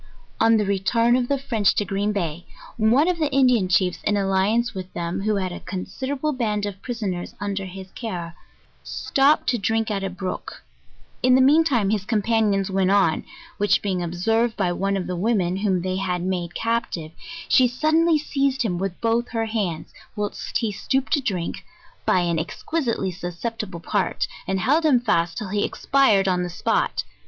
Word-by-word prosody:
On 225 0 +5
the 210 - +1
return 230 +5 +2
of 250 -1 +1
the 280 - +1
French 225 -7 +1
to 205 - +1
Green 200 +2 -1
Day, 175 -4 -3 0.3
one 235 +8 +3
of 360 -2 0
the 305 -2 +1
Indian 250 -7 +4
chiefs 180 -1 +2
in 205 - +1
alliance 200 +5 +1
with 185 -1 -7
them, 170 +2 -3
who 215 +1 +1
had 185 -2 -1
a - - -6
considerable 265 +10 -3
band 210 -5 -1
of 200 -1 -6
prisoners, 205 -8 -4
under 200 -1 -3
his 190 0 -9
care, 175 -8 -5 0.5
stopped 280 +3 +2
to 240 - +1
drink 225 +2 0
at 195 -1 -2
a 195 - -1
brook; 185 0 -6 0.6
in 255 0 +5
the - - +5
mean 290 +5 +6
time 235 -10 +1
his 210 -3 0
compan 220 0 +1
ions 195 0 0
went 190 -1 +2
on, 195 -5 +3 0.4
which 205 0 +2
being 190 -3 -1
observed 225 +7 0
by 185 -3 +1
one 195 +2 0
of 185 - -3
the 180 - -3
women, 185 -2 +1
whom 190 -3 0
they 185 0 -1
had 180 -2 -1
made 180 -2 -2
captive, 230 -9 -2 0.4
she 255 -2 +5
suddenly 310 +6 +2
seized 275 -3 0
him 180 -6 -1
with 195 -2 -3
both 230 +1 +1
her 225 -1 -1
hands, 200 -8 -3 0.2
whilst 210 0 -3
he 225 -3 -1
stooped 265 +7 -1
to 290 - +3
drink, 185 -9 -3 0.4
by 180 - +4
an 170 -2 0
exquisitely 230 - -2
susceptible 180 +2 -5
part, - - -1 0.2
and 190 0 0
held 295 - +3
him 285 -6 +4
fast 170 -8 0
till 210 - -4
he 205 +1 0
expired 215 -9 +2
on 180 -1 +2
the 180 - -2
spot. 175 - 0
205 Hz, 185 wpm, -23 LUFS, 185-240 Hz, 0.6 s, mean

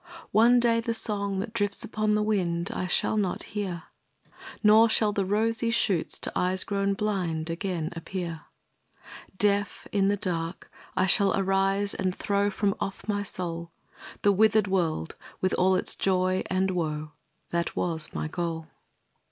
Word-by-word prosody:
One 235 +4 +5
day 235 -1 +2
the 230 0 -2
song 200 -3 -1
that 215 +2 -7
drifts 205 0 0
upon 215 -1 0
the 210 - +1
wind, 175 -5 -1
I 185 - -3
shall 215 - +1
not 195 -4 -1
hear; 185 -5 -3 0.8
Nor 220 +2 +6
shall 215 -1 +3
the 200 -1 0
rosy 225 +3 +3
shoots 195 -7 +4
to - - -2
eyes 185 +1 +1
grown 200 -1 -1
blind 175 -6 -2
Again 170 -2 -3
appear. 170 -1 -6 0.9
Deaf, 205 0 0
in 195 -2 +2
the 205 +1 +1
dark, 170 -2 -4 0.3
I 185 - +3
shall 195 +1 +3
arise 195 +1 +1
and 185 -1 -2
throw 200 0 0
From 200 0 0
off 195 - -5
my 205 -1 0
soul, 170 -3 -3 0.5
The 205 - +5
withered 215 +1 +3
world 170 - -1 0.3
with 185 - 0
all 185 +1 +3
its 185 - +1
joy 185 -1 +1
and 185 +1 0
woe, 155 -4 -3 0.4
That 170 0 -2
was 160 -3 -2
my - - -3
goal. 165 -1 -4
195 Hz, 155 wpm, -27 LUFS, 175-210 Hz, 0.9 s, Nor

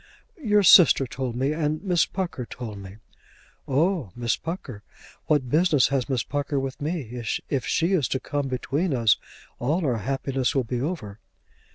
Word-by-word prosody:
"Your 210 -5 +3
sister 170 -6 +7
told 125 -1 -4
me, 135 +4 0
and 155 +1 -1
Miss 180 -4 +2
Pucker 170 -10 -4
told 105 -5 -7
her." 100 +3 -13 0.7
"Oh, 155 - +1
Miss 120 -1 0
Pucker! 155 - -6 0.5
What 135 -5 +1
business 155 -6 +4
has 135 -1 -1
Miss 130 -3 0
Pucker 145 0 -2
with 135 +2 -5
me? 140 -7 -4 0.3
If 135 -3 -1
she 170 +4 +1
is 150 -10 +2
to 130 - -1
come 145 0 -3
between 135 +5 -1
us 115 -3 +4 0.4
all 155 +8 0
our 125 -4 +1
happiness 135 +3 -1
will 135 - +2
be 120 +1 -3
over." 130 - -4
135 Hz, 165 wpm, -25 LUFS, 125-160 Hz, 0.7 s, sister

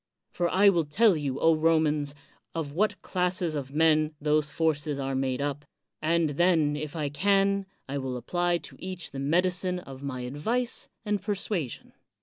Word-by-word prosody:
For 175 -1 0
I 200 +3 +6
will 170 -5 +2
tell 200 +7 +4
you, 140 -3 -2
Romans, 155 -2 +2 0.4
of 160 -3 -3
what 205 +5 0
classes 180 -2 0
of 140 -3 -4
men 155 0 +3
those 150 0 +1
forces 150 -2 0
are 135 -1 -2
made 130 0 -1
up, 145 0 -3 0.4
and 160 0 +2
then, 160 -2 +3
if 150 +1 -5
I 150 -3 -1
can, 195 +4 +2 0.2
I 140 +1 -3
will 130 -2 -3
apply 175 +8 0
to 150 - -12
each 185 -3 -6
the 135 - -6
medi 170 +7 +2
cine 180 0 -1
of 135 -1 -10
my 135 -3 -4
advice 185 - -2 0.2
and 210 -2 0
persuasion. 195 - -3
155 Hz, 165 wpm, -28 LUFS, 145-180 Hz, 0.4 s, I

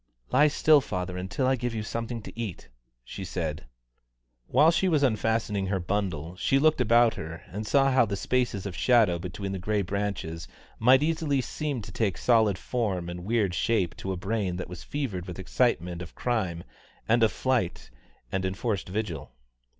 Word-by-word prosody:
"Lie 145 +4 +6
still, 150 0 +5
father, 90 -5 -4
until 95 +8 -2
I 130 +1 +3
give 120 -1 -3
you 110 - -2
something 115 +1 -4
to - - -9
eat," 110 - -6 0.3
she 95 - -7
said. 80 -5 -4 0.8
While 150 +6 +5
she 185 +2 +2
was 150 -4 +2
unfastening 110 -4 +1
her 95 0 0
bundle, 90 -3 -2
she 135 - +2
looked 155 -1 +3
about 115 0 +5
her, 80 0 -7
and 105 +4 -5
saw 135 -1 +4
how 130 -3 +4
the 100 - -2
spaces 120 -2 -1
of 95 -3 -5
shadow 110 -8 +4
between 95 +3 -5
the 95 - -3
grey 105 +2 0
branches 95 -4 -3 0.3
might 130 +5 +6
easily 155 -3 +1
seem 135 -2 -3
to 100 - -9
take 100 -1 -1
solid 110 -5 +3
form 95 -9 -2
and 90 0 -6
weird 105 -4 +1
shape 95 -4 +1
to 95 - -4
a 95 - -3
brain 95 -1 -1
that 90 -1 -5
was 90 -2 -8
fevered 110 -12 -4
with 90 - -7
excitement 90 -4 0
of 85 - -9
crime 95 -9 -1 0.4
and 115 +1 +3
of 110 - +4
flight 125 - -1 0.4
and 95 0 -1
enforced 95 +1 -2
vigil. 95 -7 -4
105 Hz, 180 wpm, -27 LUFS, 90-120 Hz, 0.8 s, Lie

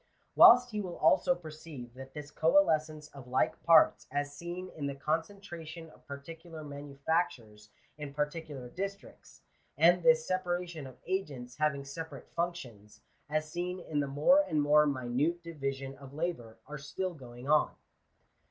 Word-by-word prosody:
Whilst 245 +1 +8
he 210 -1 -2
will 180 -3 -6
also 270 -2 +4
perceive 155 - -10
that 135 +1 -11
this 150 -1 -7
coalescence 155 -3 +2
of 135 -3 -12
like 130 +6 0
parts/ 165 -2 +5
as 145 0 -2
seen 175 +3 -6
in 145 -2 -3
the 140 - -4
concentration 165 +1 -4
of - - -22
particular 160 +3 -9
manufactures 140 -6 -3 0.3
in 145 -1 -5
par 150 +1 +1
ticular 150 -5 -8
districts, 195 +1 -7 0.4
and 175 +4 +5
this 160 -1 +5
separation 175 -4 -2
of 130 -1 -13
agents 140 -10 -3
having 150 -2 0
separate 160 +4 -8
functions, 130 - -5 0.3
as 155 0 -1
seen 180 +2 -3
in 155 -4 -3
the 140 - 0
more 150 - +5
and 160 - -1
more 150 +1 +5
minute 140 +6 0
division 135 -4 -4
of 140 0 -12
labour, 135 -9 -3
are 150 +1 -7
still 180 +6 -4
going 125 -3 -11
on. 150 +1 +4
155 Hz, 150 wpm, -31 LUFS, 140-170 Hz, 0.4 s, Whilst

